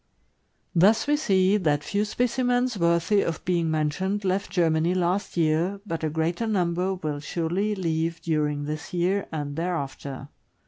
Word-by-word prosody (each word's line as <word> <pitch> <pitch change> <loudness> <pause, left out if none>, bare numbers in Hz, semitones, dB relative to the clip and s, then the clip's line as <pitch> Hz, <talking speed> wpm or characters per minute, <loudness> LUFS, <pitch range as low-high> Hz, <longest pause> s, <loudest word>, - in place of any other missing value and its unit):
Thus 200 +6 +4
we 295 +1 +3
see 195 -8 +3
that 150 -6 +1
few 205 +1 0
specimens 245 +2 0
worthy 170 +3 +2
of 165 +1 -3
being 170 -3 +1
men 155 -1 +1
tioned 190 +6 -2
left 190 +2 0
Germany 165 0 +2
last 180 +2 -1
year, 165 +4 +1
but 165 -5 -4
a 155 - +1
greater 165 +8 -1
number 185 -2 0
will 155 -5 -4
surely 175 +7 -1
leave 165 -2 -1
during 150 -3 -1
this 155 +3 -5
year 185 +3 +1
and 145 -3 -4
thereafter. 140 -5 -4
175 Hz, 150 wpm, -25 LUFS, 160-200 Hz, -, Thus